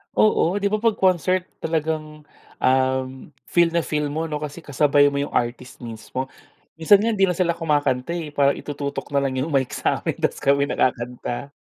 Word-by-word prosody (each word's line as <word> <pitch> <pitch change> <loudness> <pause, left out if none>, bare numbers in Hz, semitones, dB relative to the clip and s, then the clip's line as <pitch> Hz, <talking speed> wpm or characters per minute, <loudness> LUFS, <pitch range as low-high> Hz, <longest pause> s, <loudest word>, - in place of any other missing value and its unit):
Oo, 205 -2 +3
di 200 - +2
ba, 215 - +1
pag 225 +1 +2
concert 185 -1 +2 0.2
talagang, 155 -1 -3 0.4
um, 130 +1 0 0.2
feel 170 -1 +3
na 170 - +2
feel 150 -2 -2
mo, 160 +1 -2
'no, 150 - -2
kasi 150 +2 -7
kasabay 145 0 +3
mo 140 - -4
yung 140 +1 -3
artist 120 +1 -3
mismo. 120 +3 -6 0.5
Minsan 195 +5 +5
nga 230 - +1
hindi 195 -2 +3
na 180 - 0
sila 170 -1 0
kumakanta, 145 -2 0
eh, 165 -3 -4
parang 140 -1 +2
itututok 145 -1 -5
na 140 - -1
lang 130 -1 -1
yung 160 - -2
mic 135 -3 0
sa'min - - -1
tas - - 0
kami 140 +1 +2
na - - -3
kakanta. 125 +2 -2
150 Hz, 185 wpm, -22 LUFS, 130-170 Hz, 0.5 s, Minsan